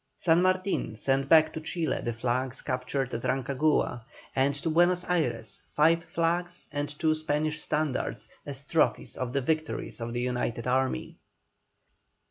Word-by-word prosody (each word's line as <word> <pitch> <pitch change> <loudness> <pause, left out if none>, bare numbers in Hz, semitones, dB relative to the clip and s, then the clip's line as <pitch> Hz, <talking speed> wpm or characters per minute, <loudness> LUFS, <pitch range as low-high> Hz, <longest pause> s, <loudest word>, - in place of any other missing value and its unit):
San 165 0 +4
Martin 185 - +1
sent 135 +4 +1
back 155 -1 +6
to 160 - -5
Chile 160 -3 -1
the 120 - -1
flags 125 +3 -2
captured 130 +1 -2
at 115 - -2
Rancagua, 130 -1 +1 0.3
and 135 +1 +2
to 155 +3 -2
Buenos 175 +2 +3
Ayres 120 - -1
five 165 +3 +3
flags 175 +2 -1
and 145 0 -2
two 160 -1 +2
Spanish 155 0 -1
standards, 150 -3 -1 0.2
as 140 -1 -4
trophies 165 - +1
of 125 -1 -3
the 140 +1 0
victories 155 -2 -2
of 115 0 -3
the 120 +1 -2
united 125 -2 -2
army. 130 - 0
145 Hz, 145 wpm, -28 LUFS, 125-160 Hz, 0.3 s, back